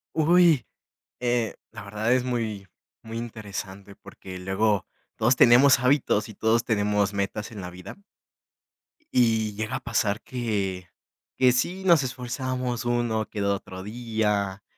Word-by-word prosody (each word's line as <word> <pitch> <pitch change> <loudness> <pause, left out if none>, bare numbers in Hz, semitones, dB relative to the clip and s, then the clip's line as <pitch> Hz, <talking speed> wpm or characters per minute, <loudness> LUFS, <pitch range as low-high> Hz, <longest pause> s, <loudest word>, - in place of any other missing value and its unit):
Uy, 160 - +4 0.5
eh, 120 -3 0 0.2
la 105 - -10
verdad 105 +3 -2
es 125 0 +3
muy 110 -6 -3 0.4
muy 115 0 -7
interesante, 100 -4 -7
porque 95 -1 -11
luego, 95 +2 0 0.3
todos 120 +4 +3
tenemos 125 +2 +6
hábitos 125 -5 +2
y - - -9
todos 110 +3 +1
tenemos 105 -2 +1
metas 100 +2 -3
en 105 - -8
la 90 - -6
vida 90 +1 -10 1.2
y 110 -3 +3
llega 110 +4 -3
a - - -2
pasar 110 -4 -1
que 100 -7 -3 0.5
que 130 -1 +5
sí, 175 +10 -1
nos 170 -5 +6
esforzábamos, 125 -1 -3
uno 120 -2 0
que 105 - -4
otro 95 -2 -3
día, 105 -3 -2
110 Hz, 135 wpm, -25 LUFS, 100-125 Hz, 1.2 s, tenemos